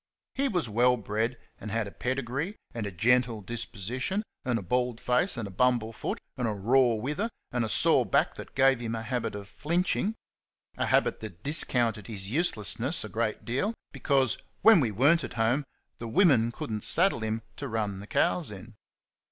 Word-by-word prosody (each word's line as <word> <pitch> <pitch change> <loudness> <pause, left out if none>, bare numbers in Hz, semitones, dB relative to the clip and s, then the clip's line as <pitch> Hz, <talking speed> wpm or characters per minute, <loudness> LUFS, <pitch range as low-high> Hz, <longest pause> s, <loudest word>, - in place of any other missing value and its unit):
He 275 +1 0
was 180 - 0
well 120 +3 +3
bred, 110 +3 -2 0.2
and 110 - -7
had 115 +1 -1
a 100 - -8
pedigree 135 - -3 0.2
and 115 -3 -3
a - - -5
gentle 120 +4 +2
disposition, 120 - -3 0.2
and 125 -2 0
a 100 - -5
bald 125 +4 0
face, 125 +8 +1
and 110 -3 -3
a - - -9
bumble 120 +1 +1
foot, - - -4 0.2
and 125 - -1
a 110 - -1
raw 120 +4 +3
wither, 150 - -2 0.2
and 120 -1 0
a 110 - -2
sore - - +4
back - - +1
that - - -11
gave 135 -1 +4
him 115 -1 -3
a 115 - -4
habit 125 -2 -2
of 100 -1 -7
"flinching" 180 - -1 0.6
a - - -1
habit - - +2
that 100 -6 -9
discounted 120 -8 +2
his 100 -2 -6
uselessness 130 - 0
a - - -7
great 115 -1 -2
deal, 135 - -1 0.2
because, 135 -5 +1 0.2
when 220 -4 +8
we 125 -6 +1
were 130 +10 +4
n't 170 - -1
at - - -6
home, 120 +5 +1 0.4
the 115 - -5
women 125 - +4
could 115 - -6
n't 105 -1 -3
saddle 185 -4 +4
him 110 0 -3
to 140 - -5
run 105 -5 -2
the 100 - -10
cows 175 +4 +1
in. 105 +3 -10
120 Hz, 195 wpm, -28 LUFS, 110-135 Hz, 0.6 s, when